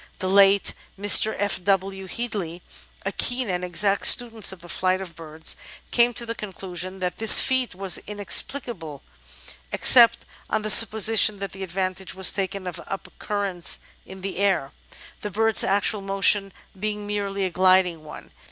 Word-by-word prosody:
The 185 - -5
late 195 +1 +3 0.3
Mr. 205 +2 +5
F. 200 -2 -3
W. 195 0 -2
Headley, 185 -6 -6 0.4
a 195 - -2
keen 245 0 -1
and 180 0 -4
exact 195 +3 0
student 230 -4 +3
of 190 - -11
the 175 - -14
flight 185 +1 -1
of 180 -4 -10
birds, 160 -1 -6 0.4
came 240 0 +3
to 240 - -2
the 230 - -5
conclusion 185 -3 -7
that 180 -1 -4
this 220 -1 +8
feat 260 -6 -1
was 195 -1 -3
inexplicable 205 - -1 0.7
except 235 -2 +5 0.2
on 220 - -2
the 215 - 0
sup 225 0 +9
position 215 -1 +3
that 195 -1 -8
advantage 190 0 -5
was 190 -1 +3
taken 195 -1 -5
of 180 -1 -7
up 195 - -8
currents 200 -4 -1 0.3
in 190 0 -13
the 195 -1 -7
air, 190 -9 -1 0.5
the 210 - -5
bird's 225 +2 +2
actual 200 +2 -1
motion 195 0 +1 0.3
being 210 0 -5
merely 200 -1 -4
a 185 - -4
gliding 185 -3 +1
one. 150 - -13
195 Hz, 160 wpm, -22 LUFS, 185-210 Hz, 0.7 s, sup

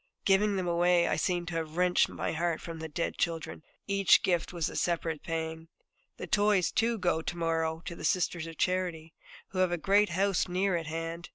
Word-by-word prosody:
Giving 200 +1 +3
them 185 -2 -2
away, 175 0 +3
I - - +1
seem 175 -2 -1
to 170 0 -5
have 160 0 -5
wrenched 180 0 +3
my - - -3
heart 165 0 -1
from 165 -1 -7
the 160 0 -6
dead 165 +3 -3
children; 165 -2 -2 0.2
each 200 -2 +4
gift 175 -3 0
was 170 -3 -1
a - - -7
separate 165 -3 -1
pang. 160 0 -4 0.5
The - - -5
toys, 205 -3 +2
too, 230 +1 +1
go 175 -4 0
to 175 - -5
morrow 165 -1 -1
to 170 - -5
the - - -10
Sisters 170 -2 0
of 165 -1 -9
Charity, 175 -3 -1 0.4
who 185 - -4
have 185 -1 +3
a 175 - 0
great 200 +5 +3
house 195 +2 +1
near 185 +1 0
at 165 -2 -3
hand. 165 +1 -5
175 Hz, 205 wpm, -30 LUFS, 165-185 Hz, 0.5 s, each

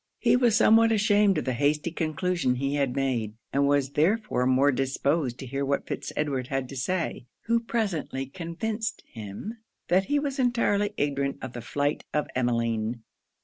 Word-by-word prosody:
He - - +3
was 245 -3 +3
somewhat 225 +1 +5
ashamed 205 -3 +3
of 155 - -2
the 130 - 0
hasty 150 +6 +1
conclusion 160 -3 0
he 135 +2 -1
had 140 -3 0
made, 120 -6 -1 0.2
and 140 0 +3
was 140 -1 +2
therefore 160 - +1
more 130 +2 +4
disposed 135 0 0
to 135 - -7
hear 135 +2 -3
what 140 0 0
Fitz - - -5
Edward 135 -4 -1
had 135 -2 -2
to 140 - -8
say, 165 -1 -2 0.2
who 230 0 +3
presently 200 - -2
convinced 185 - -4
him 115 - -8 0.3
that 190 +2 +3
he 290 - +1
was 285 -1 -2
entirely 215 -5 +1
ignorant 140 -1 -1
of 130 -2 -6
the 120 - -6
flight 145 +5 -1
of 150 - +1
Emmeline. 115 -2 -1
145 Hz, 170 wpm, -27 LUFS, 130-205 Hz, 0.3 s, somewhat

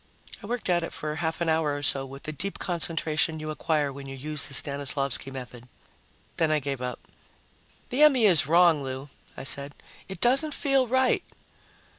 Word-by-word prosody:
I - - -9
worked 240 +1 -3
at 175 -1 +2
it 165 - -5
for 150 0 -4
half 160 0 -2
an 170 - 0
hour 160 -2 +1
or 145 - -6
so 135 -1 +2
with 135 +1 -11
the 155 - -4
deep 185 +7 -4
concentration 165 -2 0
you 155 0 -4
acquire 150 -2 -1
when 135 0 -9
you 135 - -6
use 150 +2 -2
the 140 - -5
Stanislavsky 140 -2 0
method. 125 -2 -9 0.7
Then 160 - +2
I 155 - +3
gave 140 -2 -3
up. 125 -1 -3 0.9
"The 255 +4 0
M.E. 270 -7 +6
is 175 -8 +5
wrong, 170 -2 +5
Lou," 135 +1 -6 0.3
I - - -6
said. 140 +1 -3 0.3
"It 190 - -7
doesn't 275 +5 +2
feel 275 -2 +2
right." 260 +1 +2
155 Hz, 185 wpm, -27 LUFS, 140-175 Hz, 0.9 s, M.E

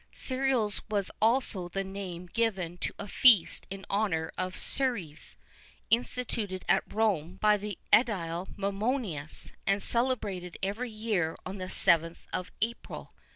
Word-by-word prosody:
Cereals 255 -5 0
was 205 -2 0
also 225 -5 +2
the 195 +2 -2
name 190 -2 -6
given 180 -4 -1
to - - -2
a - - -6
feast 220 -6 +5
in 195 0 -7
honour 195 -6 0
of 185 0 -3
Ceres, 225 - -1 0.6
instituted 225 -5 0
at 195 +2 +2
Rome 185 -6 0
by 210 0 +5
the 205 -1 -5 0.2
edile 185 -7 +2
Mumonius, 200 - -2 0.2
and 195 +1 +2
celebrated 210 -8 +1
every 215 +6 -2
year 215 -7 -1
on 190 +1 -6
the 185 - -3
7th 165 -2 +3
of 185 - -3
April. 235 +1 -5
200 Hz, 130 wpm, -30 LUFS, 180-225 Hz, 0.6 s, feast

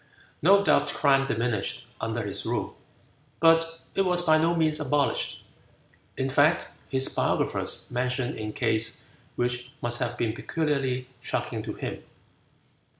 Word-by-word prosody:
No 200 +5 +6
doubt - - +3
crime 135 -2 +3
diminished 115 -1 -2 0.2
under 115 0 -2
his 100 - -3
rule, - - -3 0.6
but 165 0 +3
it - - +1
was 180 -2 +4
by 155 -1 +5
no 165 +2 +2
means 155 -2 +2
abolished. 145 -1 0 0.7
In 130 - 0
fact, 145 +5 +3 0.2
his 135 -1 +2
biographers - - 0
mention 125 0 -1
a 105 0 -4
case 110 +2 0 0.3
which 125 +1 -2
must 120 0 -1
have 120 -1 -2
been 115 -2 0
peculiarly 135 -2 -1
shocking - - -3
to - - -5
him. - - -5
130 Hz, 135 wpm, -27 LUFS, 120-160 Hz, 0.7 s, No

